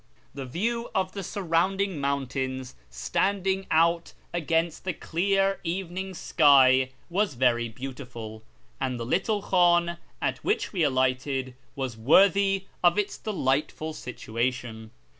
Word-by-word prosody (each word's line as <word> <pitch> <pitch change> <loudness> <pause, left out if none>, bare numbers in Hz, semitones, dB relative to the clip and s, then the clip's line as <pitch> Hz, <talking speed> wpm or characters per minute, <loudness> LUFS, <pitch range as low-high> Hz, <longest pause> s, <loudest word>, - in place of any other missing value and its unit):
The 135 -2 -6
view 230 - -2
of 185 -1 0
the 200 - -5
surrounding 190 -1 0
mountains 130 -2 -2 0.2
standing 190 - -1
out 170 +1 +2 0.2
against 165 -1 0
the 185 - -2
clear 195 +4 0
evening 185 +2 -4
sky 130 -5 +5 0.2
was 190 -3 0
very 120 -2 +2
beautiful, 120 -3 -8 0.4
and 130 -2 -2
the 115 - -4
little 195 - 0
hliim 175 -2 +3 0.2
at - - -1
which 420 - 0
we 185 - -1
alighted 130 -1 0 0.2
was 130 -5 -4
worthy 195 - +4 0.2
of 175 +1 +5
its 205 -1 0
delightful 155 - -1
situation. 120 -3 -4
160 Hz, 120 wpm, -27 LUFS, 130-190 Hz, 0.4 s, sky